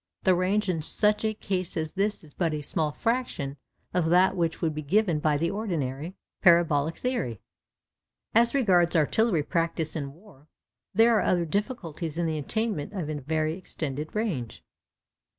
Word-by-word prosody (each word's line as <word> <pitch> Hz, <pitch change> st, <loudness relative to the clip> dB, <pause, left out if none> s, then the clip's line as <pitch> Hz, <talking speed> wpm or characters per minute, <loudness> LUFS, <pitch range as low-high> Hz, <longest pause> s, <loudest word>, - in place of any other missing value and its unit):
The 185 Hz, -, +5 dB
range 190 Hz, +4 st, +1 dB
in 170 Hz, -4 st, 0 dB
such 210 Hz, +6 st, +2 dB
a 215 Hz, 0 st, 0 dB
case 185 Hz, -4 st, -2 dB
as 160 Hz, -1 st, -2 dB
this 200 Hz, 0 st, -1 dB
is 150 Hz, -3 st, -15 dB
but 165 Hz, -4 st, 0 dB
a 150 Hz, -, -4 dB
small 150 Hz, +1 st, 0 dB
fraction 225 Hz, -, -2 dB, 0.4 s
of 175 Hz, -3 st, +1 dB
that 185 Hz, +2 st, +4 dB
which 165 Hz, -3 st, -1 dB
would 160 Hz, -3 st, 0 dB
be 155 Hz, -, -4 dB
given 175 Hz, +1 st, +2 dB
by 150 Hz, -1 st, +2 dB
the 170 Hz, +3 st, 0 dB
ordinary 170 Hz, -, -3 dB, 0.3 s
parabolic 165 Hz, -3 st, +4 dB
theory. 185 Hz, -, -2 dB, 0.9 s
As 235 Hz, +3 st, +4 dB
regards 180 Hz, -9 st, +3 dB
artillery 170 Hz, +2 st, +2 dB
practice 165 Hz, -1 st, -1 dB
in 140 Hz, -3 st, -4 dB
war, 165 Hz, -4 st, -19 dB, 0.4 s
there 225 Hz, +2 st, +5 dB
are -, -, +1 dB
other 175 Hz, -2 st, +2 dB
difficulties 170 Hz, -, -3 dB
in 170 Hz, -, 0 dB
the 160 Hz, -1 st, -1 dB
attainment 210 Hz, 0 st, -2 dB
of 170 Hz, -6 st, -3 dB
a 150 Hz, -, -3 dB
very 155 Hz, +2 st, -1 dB
extended 155 Hz, -4 st, -5 dB
range. 175 Hz, -, -3 dB
170 Hz, 165 wpm, -27 LUFS, 155-205 Hz, 0.9 s, The